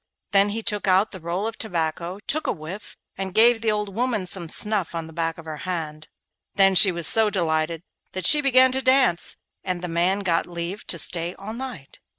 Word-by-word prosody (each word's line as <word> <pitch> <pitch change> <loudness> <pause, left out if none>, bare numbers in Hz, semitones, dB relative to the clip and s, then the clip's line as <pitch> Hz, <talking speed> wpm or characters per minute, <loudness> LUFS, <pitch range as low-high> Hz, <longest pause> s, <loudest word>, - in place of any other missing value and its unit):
Then 200 0 +4
he 225 +2 -4
took 210 -2 -1
out 190 +3 +3
the 190 - -9
roll 175 +5 -3
of 225 0 -5
tobacco, 170 -2 -3
took 310 +2 -1
a - - +2
whiff, 170 +5 -8 0.2
and 190 -1 -5
gave 230 +1 +5
the 225 - 0
old 210 -2 -2
woman 235 -5 -1
some 175 -2 -5
snuff 205 -2 0
on 165 -1 -3
the 160 - -12
back 165 0 -2
of 165 - -12
her 155 -1 -6
hand. 155 -3 -5 0.5
Then 195 -1 +4
she 190 +1 +7
was 170 -2 -1
so 220 +8 +3
delighted 165 -3 -1 0.3
that 185 - -3
she 300 0 +8
began 260 -2 +5
to 265 +1 -1
dance, 260 -9 +2 0.3
and 180 -1 -4
the - - -3
man 175 +4 0
got 175 -4 0
leave 175 +3 -6
to 170 - -2
stay 170 +2 -1
all 205 +3 -8
night. 245 - -8
185 Hz, 210 wpm, -23 LUFS, 170-215 Hz, 0.5 s, she